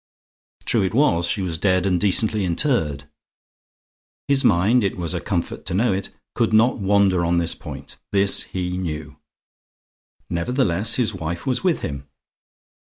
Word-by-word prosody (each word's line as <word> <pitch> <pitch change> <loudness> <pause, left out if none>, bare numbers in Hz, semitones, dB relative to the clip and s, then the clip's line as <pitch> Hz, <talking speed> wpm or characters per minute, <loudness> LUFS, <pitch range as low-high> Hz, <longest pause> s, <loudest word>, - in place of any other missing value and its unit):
True 115 - +2
it 95 +2 -1
was, 85 - +3
she 95 +3 -1
was 85 -3 -3
dead 95 0 +2
and 90 -3 +1
decently 105 +1 +2
interred. 85 - 0 1.2
His 140 -1 +2
mind 105 +8 +3
it 100 - -1
was 85 -1 -2
a 90 - -3
comfort 90 -5 -3
to - - -2
know 110 +1 +2
it 95 +1 -3 0.2
could 115 -2 0
not 115 +3 +4
wander 100 -3 +3
on 85 +1 +1
this 85 -1 0
point; - - -10
this 100 0 +2
he 90 0 -3
knew. 75 -4 -5 1.1
Nevertheless, 100 +2 0
his 120 -4 +1
wife 85 - -5
was 130 +3 -1
with 180 -3 +1
him. 70 -1 -5
95 Hz, 155 wpm, -22 LUFS, 85-110 Hz, 1.2 s, not